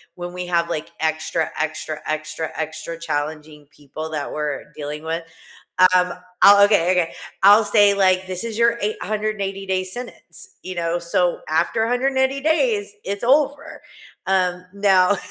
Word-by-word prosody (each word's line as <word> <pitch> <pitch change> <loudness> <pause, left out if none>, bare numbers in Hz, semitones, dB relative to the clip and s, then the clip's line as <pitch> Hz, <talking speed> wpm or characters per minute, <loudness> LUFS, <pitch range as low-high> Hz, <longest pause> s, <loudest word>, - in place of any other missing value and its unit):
when 175 0 -7
we 180 0 -5
have, 170 -1 +1
like, 155 -3 -4
extra, 160 +1 -1
extra, 155 -1 -3
extra, 155 +1 -3
extra 160 +1 -5
challenging 150 -1 -4
people 150 +2 -8
that 150 -2 -4
we're 150 -2 -3
dealing 150 +1 -6
with. 165 +1 -3 0.7
Um, 180 -1 +2 0.3
I'll 200 0 +8
Okay, 185 -4 +3
okay. 180 -3 +1 0.3
I'll 205 +3 +8
say 205 -1 +5
like, 185 -1 +2
"This 185 +2 -5
is 230 -2 -5
your 235 0 +3
880 210 -2 -3
day 190 -1 0
sentence," 240 +7 -9
you 185 0 -6
know, 170 0 -1
so 175 +1 0
after 190 +8 +1
180 265 +3 +1
days, 410 - +1
it's 200 +2 -4
over. 285 +3 +1 0.4
Um, 180 -1 0
now 195 -1 +3
180 Hz, 145 wpm, -21 LUFS, 160-210 Hz, 0.7 s, I'll